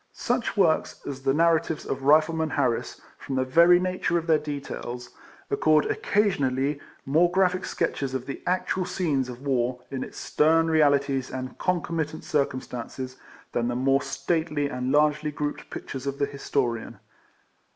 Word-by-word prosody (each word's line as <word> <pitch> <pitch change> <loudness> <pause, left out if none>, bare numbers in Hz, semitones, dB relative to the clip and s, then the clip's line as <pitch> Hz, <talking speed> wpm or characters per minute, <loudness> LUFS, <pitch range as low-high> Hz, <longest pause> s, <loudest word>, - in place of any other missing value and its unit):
Such 245 -2 -1
works 170 -5 +2
as 135 -2 -5
the 135 - +2
narratives 165 -1 +2
of 135 - -3
Rifleman 155 +3 +3
Harris, 120 -4 -1 0.2
from 135 - -5
the 130 0 +1
very 170 +6 +6
nature 180 -1 0
of 165 - -2
their 160 -2 +4
details, 135 -4 -6 0.4
afford 155 +2 +3
occasionally 145 -9 +1 0.3
more 160 +6 +4
graphic 185 0 +1
sketches 135 -5 -2
of 130 -1 -3
the 135 - -6
actual 185 +1 0
scenes 150 -8 -1
of 125 +2 -9
war, 125 -2 0
in 135 -1 -3
its - - -10
stern 165 +2 +2
realities 140 -4 +2
and 130 -1 -6
concomitant 165 -3 -1
circumstances, 130 -2 -3 0.3
than 120 0 0
the 120 - -1
more 135 +2 +2
stately 160 -4 -1
and 125 0 -2
largely 150 0 +3
grouped 145 0 -4
pictures 135 0 -6
of 140 0 -2
the 140 - +1
Historian. 135 -4 -2
145 Hz, 150 wpm, -26 LUFS, 130-165 Hz, 0.4 s, very